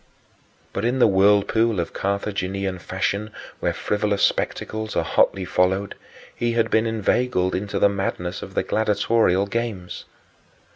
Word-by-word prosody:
But 100 - -3
in 120 +3 +1
the 125 - +5
whirlpool 105 +2 +3
of 85 - -3
Carthaginian 100 -1 -2
fashion 100 +3 -2 0.3
where - - 0
frivolous 105 -1 -1
spectacles 110 0 -1
are - - +2
hotly 95 -1 +2
followed 95 +4 +1 0.4
he 120 0 -1
had 115 -1 +1
been 110 +1 +3
inveigled 110 -3 0
into 100 +2 -2
the - - +5
madness 95 -3 -3
of - - -9
the - - +1
gladiatorial 105 -2 +2
games. 100 -4 -4
100 Hz, 135 wpm, -23 LUFS, 95-110 Hz, 0.4 s, the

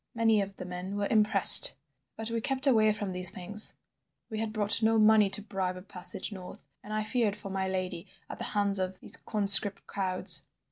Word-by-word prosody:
Many 225 -2 0
of 195 0 -8
the - - -10
men 180 +2 -8
were 205 - -3
impressed. 215 -2 +7 0.4
But 225 +1 -6
we 230 0 -4
kept 270 +3 -1
away 220 -5 +2
from 205 -2 -6
these 180 -1 +1
things; 205 +4 0 0.6
we 215 - -6
had 220 -1 -5
brought 215 +1 -3
no 225 0 +1
money 215 -1 +3
to 210 - +1
bribe 190 -3 -5
a 180 - -12
passage 185 +1 -6
north, 185 -6 -12 0.2
and 210 - -12
I 215 0 -3
feared 220 -2 -3
for 200 -2 -10
my 190 0 -4
lady 185 -1 -6 0.2
at - - -11
the - - -5
hands 200 -1 0
of 185 0 -6
these - - 0
conscript 200 -1 +2
crowds. 185 -2 0
205 Hz, 200 wpm, -27 LUFS, 190-215 Hz, 0.6 s, impressed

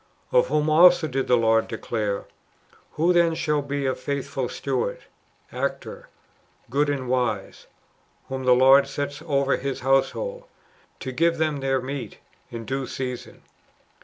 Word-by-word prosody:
"^ - - -2
Of - - +5
whom 150 0 +1
also 175 +1 +6
did 135 -1 -2
the 125 - +5
Lord 115 -1 +2
declare, 105 -3 -3 0.3
" - - -32
Who 170 +4 +2
then 170 -2 +3
shall 150 -2 0
be 140 0 -3
a 130 - +1
faithful 140 -1 -3
steward 130 -7 -3 0.5
{actor)^ - - -4 0.7
good 145 +3 +2
and 135 -3 -2
wise, 120 -6 -2 0.6
whom 130 0 -4
the 125 -1 +5
Lord 135 +2 +6
sets 145 +1 -4
over 140 -3 +1
His 135 0 -4
household, 485 - 0 0.6
to 130 - -4
give 165 +5 +1
them 155 -2 0
their 135 -1 0
meat 130 -4 -6 0.3
in 115 -1 -7
due 135 +1 -3
season? 125 -1 -6
135 Hz, 150 wpm, -24 LUFS, 130-150 Hz, 0.7 s, also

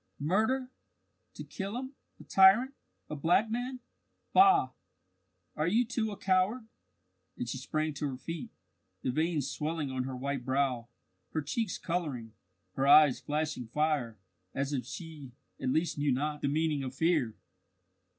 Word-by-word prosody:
"Murder, 220 - 0 0.6
to - - -7
kill 200 +3 -5
him 260 +2 -6 0.3
a - - -11
tyrant 195 +8 +5 0.3
a 150 - -5
black 175 +9 +2
man! 250 +2 -3 0.5
Bah! 390 +1 +6 0.8
Are 155 +1 0
you 225 +7 +3
too 230 -2 -1
a 205 - -6
coward?" 195 +5 +1 0.7
And - - -3
she - - -4
sprang 155 -1 -2
to 145 +1 -3
her 130 - -5
feet, 165 +3 -6 0.5
the 130 - 0
veins 155 0 0
swelling 150 -1 -3
on 130 -1 -2
her 130 -1 -5
white 135 0 -3
brow, 130 -2 0 0.5
her 155 - 0
cheeks 215 - -2
colouring, 145 -11 -3 0.4
her 135 +1 0
eyes 145 -2 +7
flashing 150 -4 -2
fire, 145 -4 0 0.4
as 140 +1 -1
if 130 - -2
she, 155 -7 -8 0.3
at - - 0
least, 160 +2 0
knew 145 -1 +2
not 150 +3 -1
the - - 0
meaning 150 0 +1
of 130 0 -5
fear. 150 -7 +1
155 Hz, 150 wpm, -31 LUFS, 140-195 Hz, 0.8 s, eyes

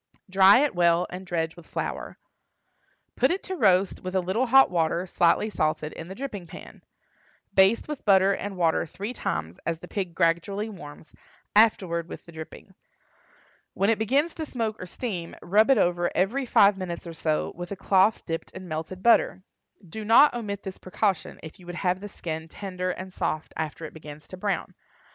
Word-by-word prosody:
Dry 195 +5 +6
it 295 - +1
well, 175 0 +3
and 185 +1 -8
dredge 165 -2 -2
with 170 - -14
flour. - - -5 1.0
Put - - +3
it 370 +3 -1
to 375 - -4
roast 195 - +3
with 185 +1 -4
a - - +4
little 190 +8 0
hot 270 -1 +6
water, 170 +1 0
slightly 175 +3 +2
salted, 155 -3 -1
in 165 - -8
the 190 - -8
dripping 210 -9 -6
pan. - - -12 0.7
Baste 195 +4 +4
with 300 -2 -6
butter 195 -1 +5
and 195 0 -5
water 165 -1 +1
three 205 +9 -6
times, 80 - -4
as 165 0 -2
the - - -11
pig 185 -5 -4
gradually 185 +7 0
warms, 155 -6 -11 0.4
afterward 180 -6 +3
with - - -9
the 170 - -13
dripping. 160 +4 -10 1.0
When 200 +3 +2
it 220 - 0
begins 275 +9 +1
to - - -2
smoke 225 -5 -3
or 180 - -6
steam, 180 -5 -5
rub 210 +6 +3
it 270 - +6
over 175 0 +2
every 245 +8 0
five 200 -3 +5
minutes 175 -2 -5
or 170 - -7
so, 155 -1 -1
with 175 +1 -7
a - - -2
cloth 195 +3 +2
dipped 165 -1 -4
in 185 0 -8
melted 160 +4 -5
butter. 230 -5 +4 0.4
Do 215 +7 -7
not 230 +8 +6
omit 210 -4 -4
this 190 -1 -7
precaution 190 0 -2
if 160 +2 -10
you 175 - -15
would 175 - -6
have 180 0 0
the 205 +1 -8
skin 160 -3 -6
tender 185 +1 -4
and 185 +1 -6
soft 155 -3 -3
after 160 +1 -4
it - - -9
begins 150 -1 -11
to 185 - -8
brown. 200 +1 -2
185 Hz, 190 wpm, -26 LUFS, 170-210 Hz, 1.0 s, Dry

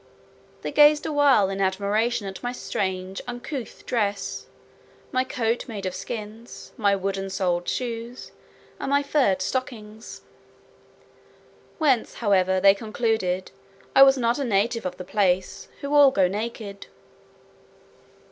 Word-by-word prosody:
They - - -3
gazed 295 0 +5
awhile 290 -9 +4
in 195 0 -3
admiration 205 +4 0
at 190 -1 -7
my 245 - -3
strange 190 -5 -4
uncouth 245 +1 -7
dress; 205 -4 -2 0.6
my 255 -1 +1
coat 235 -2 -2
made 205 -5 -6
of 185 - -2
skins, 215 +4 -8
my 200 -3 +2
wooden 195 0 -3
soled 180 -2 -1
shoes, 235 0 -5 0.5
and - - -3
my 285 +1 +2
furred 250 -11 +1
stockings; 220 -2 -5 1.5
whence, 275 -7 +1
however, 190 -4 +2
they 195 +1 +6
concluded, 215 -3 -2 0.4
I 270 - +7
was 270 0 +8
not 235 +1 +1
a - - 0
native 230 -1 0
of 180 0 -7
the 185 - -6
place, 185 -2 0
who 280 +1 -3
all 290 -2 +8
go 190 -8 +2
naked. 210 0 -5
215 Hz, 130 wpm, -24 LUFS, 195-245 Hz, 1.5 s, was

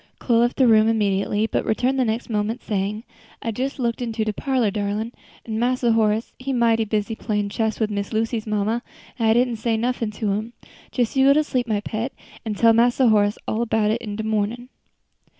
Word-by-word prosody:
Chloe 235 -2 +2
left 240 +1 +2
the 260 - +5
room 220 -1 +5
immediately, 205 -1 +1
but - - -1
returned 255 +4 0
the - - +4
next 225 +2 -2
moment, 220 +2 -2
saying, 205 +1 -2 0.4
"I 230 - -2
jes 265 +3 -2
looked 235 -2 -1
into 225 -2 -2
de 215 - -1
parlor, 255 -4 0
darlin', 210 +2 -2 0.3
an' 220 -1 -3
Mass 250 +2 +1
Horace 225 -2 +2
he 270 +1 -3
mighty 230 -2 +2
busy 215 +1 -1
playin' 210 -2 -2
chess 220 +1 -1
wid 215 -2 0
Miss 200 -1 -3
Lucy's 225 0 -1
mamma, 215 +2 0 0.4
an' 225 - +2
I 220 - +5
didn't 240 0 +2
say 225 0 0
nuffin' 235 -1 -1
to 210 -1 -1
him. 215 +4 -3 0.4
Jes 245 -1 -1
you 270 +1 +5
go 290 - +5
sleep, 250 -4 -1
my 210 -2 0
pet, 225 +5 -4 0.3
an' 220 -2 -3
tell 230 +2 +5
Mass 240 +2 +3
Horace 215 -5 +3
all 230 +2 -1
'bout 220 -1 +2
it 230 - -1
in 210 -2 -5
de 220 - -4
mornin'." 220 +3 -2
225 Hz, 205 wpm, -22 LUFS, 215-240 Hz, 0.4 s, the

